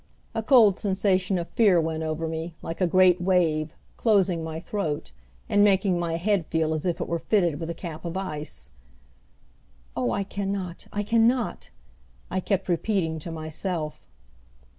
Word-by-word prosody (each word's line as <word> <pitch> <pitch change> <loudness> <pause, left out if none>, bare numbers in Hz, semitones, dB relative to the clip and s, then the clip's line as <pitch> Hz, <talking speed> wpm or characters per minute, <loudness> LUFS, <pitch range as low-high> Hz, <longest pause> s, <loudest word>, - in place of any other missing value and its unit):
A 225 - -1
cold 220 -5 +5
sensation 190 -2 +1
of 170 -1 -3
fear 200 -6 +4
went 160 0 -1
over 160 +1 -2
me, 160 +1 -5
like 165 +3 -5
a 180 - +4
great 180 0 +5
wave, 165 -4 +2 0.3
closing 190 -7 +2
my 160 0 -4
throat, 170 -5 -3 0.4
and 205 0 +4
making 195 -3 +3
my 165 -1 -1
head 190 -1 0
feel 160 -1 0
as 155 +3 -2
if 175 - -1
it - - -3
were 170 0 -1
fitted 175 -6 +1
with 165 -1 -4
a 170 - -3
cap 165 -3 -7
of 170 +1 -4
ice. 150 - -6 1.2
"Oh, 125 -2 0
I 200 - 0
can 200 0 -3
not, 185 -3 -5
I 205 - -2
can 225 +2 +4
not!" 245 -1 -1 0.6
I 185 - 0
kept 195 0 -1
repeating 175 -2 0
to 165 +2 -7
myself. 155 0 -4
175 Hz, 170 wpm, -26 LUFS, 160-195 Hz, 1.2 s, cold